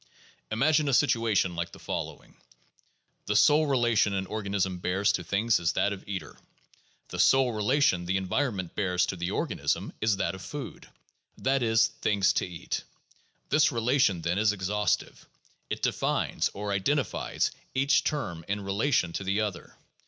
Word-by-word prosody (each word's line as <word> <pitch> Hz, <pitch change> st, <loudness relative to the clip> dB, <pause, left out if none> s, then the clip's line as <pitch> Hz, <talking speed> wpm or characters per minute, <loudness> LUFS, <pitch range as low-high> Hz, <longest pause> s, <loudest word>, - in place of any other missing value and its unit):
Imagine 145 Hz, +6 st, +2 dB
a 135 Hz, -, +3 dB
situation 115 Hz, -10 st, +2 dB
like 85 Hz, 0 st, -3 dB
the -, -, -10 dB
following. -, -, -6 dB, 0.9 s
The -, -, 0 dB
sole 150 Hz, +1 st, +5 dB
relation 120 Hz, -6 st, +2 dB
an 95 Hz, 0 st, -1 dB
organism 100 Hz, -3 st, -2 dB
bears 95 Hz, +3 st, +1 dB
to 90 Hz, -, -2 dB
things 105 Hz, +5 st, +1 dB
is 85 Hz, 0 st, 0 dB
that 100 Hz, -, +1 dB
of 100 Hz, -, -9 dB
eater; 95 Hz, -7 st, -6 dB, 0.7 s
the -, -, -6 dB
sole 135 Hz, -2 st, +4 dB
relation 105 Hz, -4 st, +2 dB
the 95 Hz, +1 st, +1 dB
en 95 Hz, -1 st, -3 dB
vironment 100 Hz, -9 st, -1 dB
bears 90 Hz, -2 st, +1 dB
to 95 Hz, -, -4 dB
the 85 Hz, 0 st, -3 dB
organism -, -, -2 dB
is 105 Hz, -2 st, +2 dB
that 90 Hz, -3 st, -1 dB
of 95 Hz, -, -9 dB
food, 145 Hz, -1 st, -8 dB, 0.5 s
that 135 Hz, 0 st, +1 dB
is, 110 Hz, -1 st, +4 dB, 0.2 s
things 100 Hz, -3 st, +2 dB
to -, -, -1 dB
eat. 85 Hz, -2 st, -5 dB, 0.7 s
This 150 Hz, +1 st, +4 dB
relation, 120 Hz, -6 st, +2 dB
then, 85 Hz, +3 st, 0 dB
is 105 Hz, -1 st, +3 dB
exhaustive. 105 Hz, +1 st, -1 dB, 0.4 s
It -, -, -4 dB
defines, -, -, 0 dB
or 100 Hz, 0 st, -3 dB
identifies, 130 Hz, +9 st, 0 dB, 0.2 s
each 140 Hz, +2 st, +3 dB
term 85 Hz, -, -3 dB
in 100 Hz, +1 st, -2 dB
relation 100 Hz, -1 st, 0 dB
to 100 Hz, -, -3 dB
the 100 Hz, +3 st, 0 dB
other. 105 Hz, -5 st, -5 dB
105 Hz, 160 wpm, -28 LUFS, 95-125 Hz, 0.9 s, sole